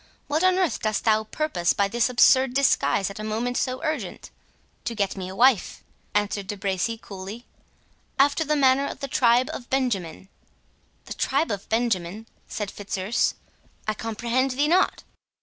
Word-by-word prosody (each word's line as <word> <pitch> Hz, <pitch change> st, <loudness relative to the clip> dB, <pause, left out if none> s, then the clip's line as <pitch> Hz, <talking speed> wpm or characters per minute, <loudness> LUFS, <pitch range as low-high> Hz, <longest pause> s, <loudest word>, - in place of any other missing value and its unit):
—What 305 Hz, +4 st, 0 dB
on 370 Hz, 0 st, +4 dB
earth 370 Hz, -5 st, +1 dB
dost 215 Hz, -1 st, -1 dB
thou 220 Hz, -1 st, +2 dB
purpose 215 Hz, -, 0 dB
by 200 Hz, -, +1 dB
this 235 Hz, +4 st, +1 dB
absurd 255 Hz, +1 st, +4 dB
disguise 265 Hz, -7 st, +2 dB
at 200 Hz, -, -10 dB
a -, -, -5 dB
moment 225 Hz, +3 st, -2 dB
so 255 Hz, +4 st, -2 dB
urgent?" 310 Hz, -1 st, -4 dB, 0.5 s
"To 235 Hz, -, -3 dB
get 200 Hz, -2 st, -1 dB
me 185 Hz, -2 st, -5 dB
a 190 Hz, -, -8 dB
wife," 245 Hz, -1 st, +3 dB, 0.3 s
answered 205 Hz, -1 st, 0 dB
De 205 Hz, -, -4 dB
Bracy 195 Hz, +4 st, -1 dB
coolly, 200 Hz, +5 st, -9 dB, 0.7 s
"after 285 Hz, +3 st, +3 dB
the 300 Hz, 0 st, 0 dB
manner 275 Hz, 0 st, +3 dB
of -, -, -7 dB
the 275 Hz, -, -4 dB
tribe 245 Hz, 0 st, +3 dB
of 240 Hz, -, -8 dB
Benjamin." 195 Hz, -10 st, -1 dB, 0.8 s
"The -, -, -6 dB
tribe 325 Hz, -, 0 dB
of 200 Hz, -1 st, -5 dB
Benjamin?" 220 Hz, -3 st, -1 dB, 0.2 s
said 210 Hz, -2 st, -4 dB
Fitzurse; 205 Hz, +1 st, -1 dB, 0.5 s
"I 215 Hz, -, +1 dB
comprehend 235 Hz, +4 st, -1 dB
thee 275 Hz, +3 st, +1 dB
not." 360 Hz, +4 st, +2 dB
230 Hz, 165 wpm, -25 LUFS, 200-265 Hz, 0.8 s, on